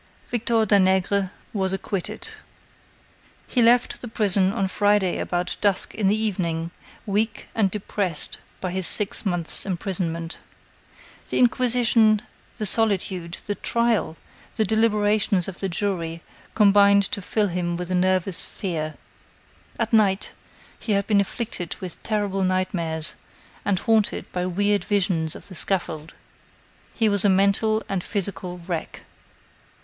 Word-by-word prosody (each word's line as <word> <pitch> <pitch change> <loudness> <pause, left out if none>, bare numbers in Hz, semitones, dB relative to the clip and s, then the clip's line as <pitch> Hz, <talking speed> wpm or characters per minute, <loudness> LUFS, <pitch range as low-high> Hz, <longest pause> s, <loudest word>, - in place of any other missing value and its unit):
Victor 230 -1 +1
Danègre 190 -1 +2 0.2
was 190 -2 0
acquitted. 195 -1 -4 1.2
He 250 - 0
left 240 +1 +3
the 245 - -6
prison 200 -4 +2
on 195 -3 0
Friday 205 -1 +2
about 175 0 -2
dusk 200 -3 +1
in 210 -3 0
the 205 +2 +3
evening, 170 -6 -1 0.3
weak 215 +2 -1
and 210 -4 +2
depressed 190 -4 -1 0.2
by 185 - -3
his 185 -1 -1
six 210 0 +1
months' 175 -3 0
imprisonment. 170 -3 -3 0.9
The - - -1
inquisition, 235 -3 +3 0.3
the 215 - -2
solitude, 190 -5 +1
the 205 - -1
trial, 230 -7 0 0.4
the 220 - +1
deliberations 210 -3 +2
of 190 -2 -7
the 195 - -2
jury, 170 -3 -2 0.3
combined 200 -1 +6
to 200 - -1
fill 205 +2 0
him 175 -1 -2
with 180 +1 -5
a - - +1
nervous 185 0 +2
fear. 155 -5 -4 0.8
At 230 0 -2
night, 205 -3 +2 0.5
he 215 - -1
had 200 -1 +1
been 205 -1 +3
afflicted 200 -4 -5
with 180 -3 -7
terrible 205 -3 -1
nightmares 180 -4 -1 0.5
and 200 -2 +1
haunted 220 +1 +1
by 180 0 -2
weird 205 +3 +1
visions 180 -6 0
of - - -11
the 190 - -11
scaffold. 165 -4 0 0.8
He 225 - +2
was 200 -2 +3
a 205 - +4
mental 200 +3 +2
and 190 -3 -2
physical 190 -3 -3
wreck. 170 -2 -5
195 Hz, 135 wpm, -24 LUFS, 180-210 Hz, 1.2 s, combined